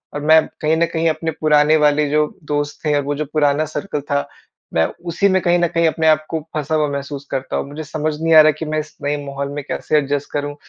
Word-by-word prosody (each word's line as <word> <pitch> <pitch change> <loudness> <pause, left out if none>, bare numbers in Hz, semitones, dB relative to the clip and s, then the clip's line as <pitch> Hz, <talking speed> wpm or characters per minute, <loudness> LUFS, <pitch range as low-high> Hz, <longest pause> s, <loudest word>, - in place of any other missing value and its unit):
और 145 - -3
मैं 160 +1 +5
कहीं 155 +1 +2
न 170 - +3
कहीं 165 0 +1
अपने 160 +1 -2
पुराने 150 0 +4
वाले 150 -1 +2
जो 150 +1 +2 0.2
दोस्त 145 0 -2
थे 150 - +2
और - - +1
वो 145 +1 -2
जो 155 +2 -3
पुराना 150 0 +2
सर्किल 155 0 -4
था, 140 0 -2 0.5
मैं 80 0 +3 0.2
उसी 175 +4 +1
में 190 0 +2
कहीं 175 0 +3
न 175 - +2
कहीं 165 0 +1
अपने 160 0 0
आप 155 -1 +3
को 160 - -2 0.2
फँसा 155 +1 -1
हुआ 155 -1 +2
महसूस 140 0 -5
करता 135 0 -3
हूँ। - - -3
मुझे 150 +2 -7
समझ 155 +1 -2
नहीं 165 0 +2
आ 155 - +11
रहा 155 0 +5
कि 160 - -6
मैं 155 0 -1
इस 155 0 -8
नए 145 +1 0
माहौल 140 0 -4
में 145 - -5
कैसे 155 - 0
एडजस्ट 145 -1 -1
करूँ, 145 0 -3
150 Hz, 255 wpm, -19 LUFS, 145-160 Hz, 0.5 s, आ